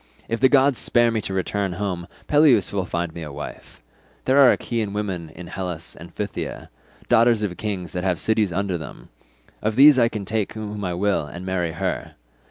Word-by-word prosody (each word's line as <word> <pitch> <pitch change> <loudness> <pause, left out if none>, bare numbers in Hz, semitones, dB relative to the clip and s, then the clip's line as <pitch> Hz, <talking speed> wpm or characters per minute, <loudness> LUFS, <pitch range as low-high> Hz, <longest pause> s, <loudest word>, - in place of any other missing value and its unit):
If 115 - -2
the 130 - +5
gods 135 -2 +4
spare 120 -1 +3
me 110 -1 -1
to 95 - -4
return 95 0 -1
home, 90 -2 -3 0.2
Peleus 145 - +4
will 95 -2 -1
find 85 -2 -3
me 85 - -7
a 75 -2 -6
wife; 70 - -9 0.4
there 135 +2 +4
are 135 -3 +8
Achaean 110 -4 -2
women 95 -6 -3
in 85 +3 -10
Hellas 90 -2 -6
and 85 0 -12
Phthia, 105 +4 -5 0.4
daughters 115 -1 +4
of 95 -4 -2
kings 95 -6 -4
that 90 +1 -3
have 90 -2 0
cities 110 -3 +1
under 95 -1 -1
them; - - -10 0.5
of 110 0 -1
these 140 +1 +8
I 115 -1 +4
can 105 -3 -5
take 105 0 -2
whom 105 -1 -6
I 90 -2 -2
will 95 -4 0
and 85 +4 -8
marry 90 -3 -1
her. 95 +3 -3
100 Hz, 195 wpm, -23 LUFS, 90-110 Hz, 0.5 s, are